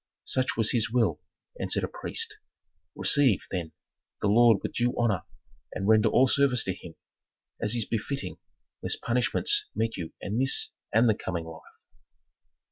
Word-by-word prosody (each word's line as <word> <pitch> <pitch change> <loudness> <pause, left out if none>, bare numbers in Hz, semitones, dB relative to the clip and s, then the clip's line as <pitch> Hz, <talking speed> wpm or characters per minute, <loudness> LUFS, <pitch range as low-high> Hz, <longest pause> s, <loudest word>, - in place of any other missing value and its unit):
"Such 130 -3 -1
was 110 -2 +3
his 115 -1 +1
will," 120 0 +1 0.4
answered - - 0
a - - 0
priest. 450 -2 -4 0.6
"Receive, 135 -9 +3
then, 85 -4 -4 0.5
the 105 - 0
lord 115 0 +6
with - - -4
due 120 0 0
honor 110 -6 0 0.5
and 95 - -3
render 110 -1 +5
all 130 - +4
service 130 -2 +2
to 95 - -2
him, 85 -2 -12 0.7
as 105 - +1
is 115 -3 +1
befitting, 135 +5 -4 0.4
lest - - -2
punishments 415 - +2
meet 115 0 -1
you 80 -2 -6
in 105 +4 -3
this 135 +1 +3 0.2
and 115 +3 +4
the 110 - +4
coming 85 -4 -5
life." 80 -1 -10
115 Hz, 155 wpm, -27 LUFS, 100-130 Hz, 0.7 s, lord